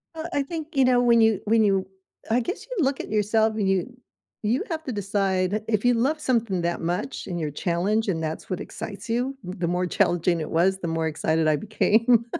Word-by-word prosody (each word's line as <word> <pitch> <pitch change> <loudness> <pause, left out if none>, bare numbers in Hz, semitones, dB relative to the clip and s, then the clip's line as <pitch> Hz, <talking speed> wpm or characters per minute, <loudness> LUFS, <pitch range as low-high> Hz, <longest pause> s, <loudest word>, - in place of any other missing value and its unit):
Uh, 320 0 -5
I 285 - +1
think, 315 +2 -7
you 270 -1 +4
know, 250 -1 +4
when 235 -1 +5
you 220 -3 +3
when 220 +1 +4
you 195 -2 +2 0.4
I 230 +2 +3
guess 360 - -4
you - - -2
look 270 0 0
at - - -6
yourself 215 +1 +2
and 210 -3 0
you 190 -2 +1 0.6
you 225 +5 +1
have 320 -2 -3
to 260 - -3
decide, 195 -1 0
if 215 0 0
you 245 - +5
love 270 +7 +1
something 230 - 0
that 170 0 -1
much 175 +9 -3
and 175 -2 -3
you're 155 -2 -2
challenged 190 +8 0
and 165 -4 -1
that's 155 0 -5
what 185 - -2
excites 205 +1 -7
you, 250 +4 -1
the 180 -1 -3
more 180 +1 0
challenging 175 0 +1
it 155 - -4
was, 190 +4 +2
the 175 - -4
more 165 0 -1
excited 160 +1 0
I 155 - +4
became. 225 - +2
210 Hz, 220 wpm, -25 LUFS, 180-245 Hz, 0.6 s, when